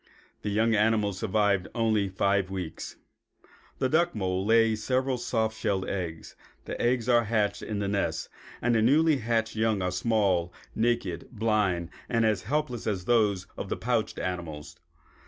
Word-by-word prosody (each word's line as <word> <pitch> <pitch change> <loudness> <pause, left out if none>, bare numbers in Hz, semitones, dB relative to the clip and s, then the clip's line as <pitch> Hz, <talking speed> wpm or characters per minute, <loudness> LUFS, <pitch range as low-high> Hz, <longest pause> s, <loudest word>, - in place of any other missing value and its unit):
The 105 - -3
young 110 +3 +2
animals 105 -2 +2
survived 100 -2 +1
only 110 -4 +1
five 95 0 +1
weeks. 90 -4 -6 0.8
The 130 - +1
duck 170 +3 +2
mole 95 -2 -1
lays 110 0 +3
several 130 0 0
soft 110 -2 -1
shelled 95 -3 -1
eggs. 85 -4 -5 0.3
The - - -5
eggs 120 -1 +1
are 120 -2 +4
hatched 105 -2 0
in 110 - -4
the 100 -1 -1
nest. 100 0 -1 0.4
The 120 -2 +3
newly 150 +6 +4
hatched 115 -2 -1
young 110 -3 +1
are 90 - 0
small, 95 -4 +1 0.2
naked, 110 -7 -1
blind 105 -7 0 0.2
and 115 -2 +2
as 105 -4 +1
helpless 130 -1 -2
as 95 -4 -2
those 105 -5 +2
of - - -6
the - - -2
pouched - - -1
animals. 80 -5 -5
110 Hz, 155 wpm, -28 LUFS, 95-115 Hz, 0.8 s, are